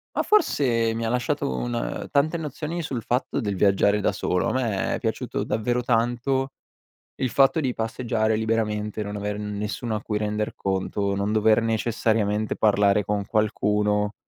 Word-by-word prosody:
Ma, - - +1
forse 120 - +2
mi 115 0 -2
ha - - 0
lasciato 120 - -1
un - - -3
tante 155 +4 +2
nozioni 160 +2 -4
sul 130 -7 -4
fatto 125 +4 -1
del 105 -6 -2
viaggiare 100 +2 +3
da 100 - +1
solo, 90 -2 0
a - - 0
me 115 -7 0
è - - -4
piaciuto - - -2
davvero 120 +3 -1
tanto 125 +3 0 0.7
il 130 - 0
fatto 140 +5 +4
di 130 -4 0
passeggiare 110 -1 -1
liberamente, 110 -1 -1
non 105 0 -5
aver 105 0 -3
nessuno 105 +2 -3
a 105 - -2
cui 105 -2 -2
render 105 0 -2
conto, 100 +1 -1
non 100 +1 -1
dover 110 +1 +4
necessariamente 110 -2 0
parlare 105 -1 +3
con 105 0 -1
qualcuno; 105 -1 +1
110 Hz, 160 wpm, -24 LUFS, 105-120 Hz, 0.7 s, fatto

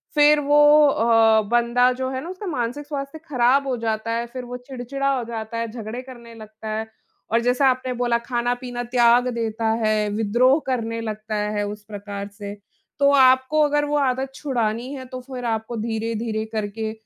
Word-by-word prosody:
फिर 295 0 +6
वो 295 +1 +6
अ, 225 -3 +4
बंदा 240 +1 +3
जो 260 +1 -3
है 260 - -3
ना 340 - -7
उसका 375 +3 -7
मानसिक 275 -1 -3
स्वास्थ्य 280 +1 -5
खराब 265 +1 +3
हो 260 - 0
जाता 225 0 -2
है, 235 +1 -1
फिर 250 +1 -7
वो 245 +1 -6
चिड़चिड़ा 265 +2 -4
हो 245 - -2
जाता 225 0 -5
है, 230 0 -2
झगड़े 225 +1 -6
करने 240 -3 -12
लगता 215 0 -11
है। 220 0 -4 0.4
और 230 - +4
जैसा 250 +3 +2
आपने 255 0 -1
बोला 240 -1 +1
खाना-पीना 245 +1 -3
त्याग 240 0 +4
देता 225 -1 -3 0.2
है, 215 -1 +1
विद्रोह 235 +7 +3
करने 230 -3 -2
लगता 215 -1 -5 0.2
है 205 - 0
उस 210 0 -7
प्रकार 200 -1 -7
से। 200 0 -8 0.5
तो 280 0 +5
आपको 260 +2 +4
अगर 295 0 +1
वो 295 0 0
आदत 265 -1 0
छुड़ानी 240 -3 -2
है 265 -2 -7
तो 255 - -5
फिर 250 -1 -7
आपको 225 0 -2
धीरे-धीरे 225 0 -2
करके, 215 0 -3
240 Hz, 180 wpm, -22 LUFS, 225-260 Hz, 0.5 s, फिर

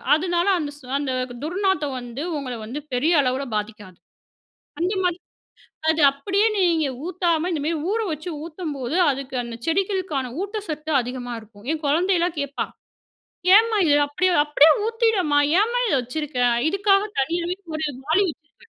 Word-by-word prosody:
அதனால 345 +2 0
அந்த 290 -2 -3
ஸ் 295 - -18 0.2
அந்த 285 -2 -2 0.3
துர்நாத்தம் 325 -5 0
வந்து 245 +4 -6
உங்கள 255 -3 -4
வந்து 275 +7 -5
பெரிய 310 +8 +2
அளவில 260 +1 -1
பாதிக்காது. 210 -3 -5 0.8
அந்த 370 +4 +1
மாதிரி, 355 0 0 0.7
அது 320 - -2
அப்படியே 390 +10 +1
நீங்க 335 -5 +2 0.2
ஊத்தாம 345 -1 0
இந்த 300 -4 -2
மாரி 330 0 0 0.2
ஊற 455 - 0
வச்சு 310 +4 -5 0.2
ஊத்தும்போது, 310 -4 -4
அதுக்கு 270 -1 -4
அந்த 235 -1 -7
செடிகளுக்கான 340 - -1
ஊட்டசத்து 320 -7 -5
அதிகமா 245 0 -5
இருக்கும். 210 0 -17
என் 315 0 -4
குழந்தையல்லாம் 345 +3 +1
கேட்பா, 280 0 -3 0.9
"ஏம்மா 450 0 +4
இதை 290 -1 +4
அப்படியே 365 +5 +1
அப்படியே 295 +1 +6 0.2
ஊத்திடேம்மா. 445 -10 +2 0.2
ஏம்மா 475 +3 0
இதை - - +2
வச்சுருக்கே?". 250 -1 -1 0.2
இதுக்காக 395 0 +3 0.2
தனியாவே 340 +5 -1 0.2
ஒரு 315 0 -1 0.2
வாளி 365 +6 +3
வச்சிருக்கேன். 300 -1 -18
315 Hz, 140 wpm, -23 LUFS, 275-370 Hz, 0.9 s, அப்படியே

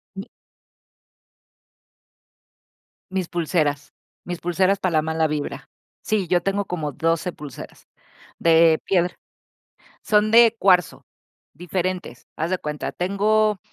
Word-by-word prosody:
Sí. 195 +4 -7 2.8
Mis 190 -3 -2
pulseras, 155 -4 -1 0.3
mis 175 -1 -4
pulseras 185 +3 +1
para 185 -2 -1
la 155 -1 +2
mala 160 0 0
vibra. 150 -1 -5 0.3
Sí, 215 -4 -1
yo 175 0 +2
tengo 195 +1 -1
como 155 -5 -4
12 165 +3 -1
pulseras. 145 -5 -11 0.5
De 165 -1 +4
piedra. 180 -2 +1 0.9
Son 210 0 +2
de 230 0 +6
cuarzo, 180 -3 +2 0.5
diferentes. 180 -4 -4
Haz 160 +2 -2
de 185 - 0
cuenta, 150 -3 -5
tengo 210 +3 +1
175 Hz, 110 wpm, -22 LUFS, 160-195 Hz, 2.8 s, de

